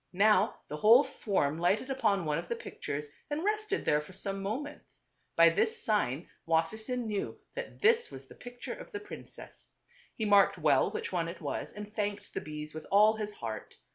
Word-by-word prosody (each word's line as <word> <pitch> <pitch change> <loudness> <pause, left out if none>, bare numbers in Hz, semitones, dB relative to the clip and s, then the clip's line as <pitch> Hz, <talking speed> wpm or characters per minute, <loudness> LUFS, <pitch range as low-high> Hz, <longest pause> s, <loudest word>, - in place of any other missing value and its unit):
Now 205 +2 +4
the 150 - -5
whole 230 - +7
swarm 190 - 0
lighted 195 +10 +1
upon 200 -9 +1
one 150 0 0
of 175 - -7
the 235 - -2
pict - - -10
ures 145 +1 -2 0.2
and 295 +2 -2
rested 425 -1 0
there 150 0 +3
for 170 +5 -13
some 195 +1 -3
moments. 265 +10 -5 0.3
By 165 0 +8
this 445 - 0
sign 170 - 0 0.2
Wasser 165 +6 +1
sein 245 +2 -3
knew 210 -2 -3 0.2
that - - -7
this 470 +2 +4
was - - -10
the - - -13
picture 245 0 -8
of - - -10
the 410 - -4
prin 410 -1 -9
cess. - - -12 0.4
He 220 - -2
marked 200 -2 +5
p 180 - -13
well 145 -3 +4
which - - -4
one 170 -3 0
it 170 +1 -7
1 - - -14 0.2
was - - -9
and 210 0 -8
thanked 205 -1 -3
the - - -2
bees 150 0 -7
with 155 0 -8
all 210 +2 +5
his 210 -1 -3
heart. 110 - -6
205 Hz, 210 wpm, -31 LUFS, 165-245 Hz, 0.4 s, By